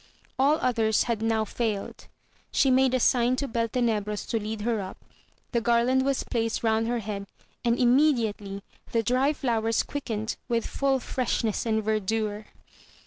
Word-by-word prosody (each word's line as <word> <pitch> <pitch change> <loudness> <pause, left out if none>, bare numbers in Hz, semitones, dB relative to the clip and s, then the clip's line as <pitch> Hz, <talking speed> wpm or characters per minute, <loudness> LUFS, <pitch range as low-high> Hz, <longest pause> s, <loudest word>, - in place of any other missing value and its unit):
All 285 +3 +4
others 225 -4 +2
had 230 -3 -2
now 225 -1 +1
failed; 215 -2 -3 0.4
she 270 - +3
made 260 0 +4
a - - +2
sign 245 0 +3
to 280 +2 -2
Beltenebros 230 -3 -1
to 225 - 0
lead 215 0 -4
her 225 -1 0
up, 190 0 -7 0.5
the 235 - +1
garland 240 +3 +3
was 275 -1 0
placed 230 -1 -2
round 225 0 +2
her 240 +1 0
head, 205 -3 -5 0.4
and 235 0 +2
immediately 235 -7 +2 0.3
the 230 -1 +2
dry 255 +5 +2
flowers 230 -6 0
quickened 220 -6 -4
with 230 -1 0
full 275 -1 0
freshness 235 -3 -1
and 220 -1 +1
verdure. 215 0 -1
230 Hz, 150 wpm, -27 LUFS, 220-250 Hz, 0.5 s, All